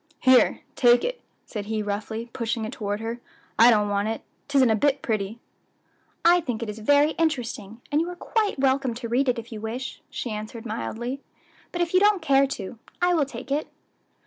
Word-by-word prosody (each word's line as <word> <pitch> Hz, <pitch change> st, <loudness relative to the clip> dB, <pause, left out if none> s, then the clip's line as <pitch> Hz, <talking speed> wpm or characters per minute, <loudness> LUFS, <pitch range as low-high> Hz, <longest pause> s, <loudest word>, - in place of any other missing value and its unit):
"Here, 255 Hz, -1 st, +5 dB
take 240 Hz, -1 st, +5 dB
it," -, -, -3 dB, 0.2 s
said 210 Hz, -3 st, -5 dB
he 215 Hz, -1 st, -1 dB
roughly, 215 Hz, +3 st, -4 dB
pushing 230 Hz, -1 st, -2 dB
it 220 Hz, -, -5 dB
toward 205 Hz, 0 st, -3 dB
her; 230 Hz, +2 st, -4 dB, 0.4 s
"I 230 Hz, +2 st, +9 dB
don't 210 Hz, -3 st, +4 dB
want 205 Hz, +1 st, 0 dB
it; 225 Hz, 0 st, -3 dB, 0.3 s
'tisn't 270 Hz, -4 st, +4 dB
a -, -, +4 dB
bit 280 Hz, +5 st, +1 dB
pretty." 215 Hz, -1 st, -2 dB, 0.9 s
"I 350 Hz, +1 st, +6 dB
think 240 Hz, -6 st, -3 dB
it 225 Hz, -, -5 dB
is 210 Hz, -, -10 dB
very 285 Hz, +7 st, +4 dB
interesting, 240 Hz, -8 st, -2 dB
and 295 Hz, +2 st, +3 dB
you 340 Hz, -, -2 dB
are 355 Hz, -, -6 dB
quite 425 Hz, +1 st, -1 dB
welcome 265 Hz, -2 st, +1 dB
to 235 Hz, 0 st, -5 dB
read 255 Hz, +3 st, +2 dB
it 245 Hz, -, +1 dB
if 230 Hz, +1 st, -7 dB
you 215 Hz, -2 st, -6 dB
wish," 240 Hz, +4 st, -5 dB
she 240 Hz, -, -4 dB
answered 215 Hz, +2 st, -6 dB
mildly; 240 Hz, +4 st, -4 dB, 0.5 s
"but 350 Hz, -, -2 dB
if 340 Hz, -, -4 dB
you 370 Hz, -, +6 dB
don't 410 Hz, 0 st, +4 dB
care 275 Hz, -4 st, +4 dB
to, 220 Hz, -4 st, -6 dB, 0.2 s
I 355 Hz, 0 st, +3 dB
will 310 Hz, -4 st, +3 dB
take 275 Hz, 0 st, -9 dB
it." 295 Hz, +2 st, 0 dB
240 Hz, 200 wpm, -25 LUFS, 220-285 Hz, 0.9 s, I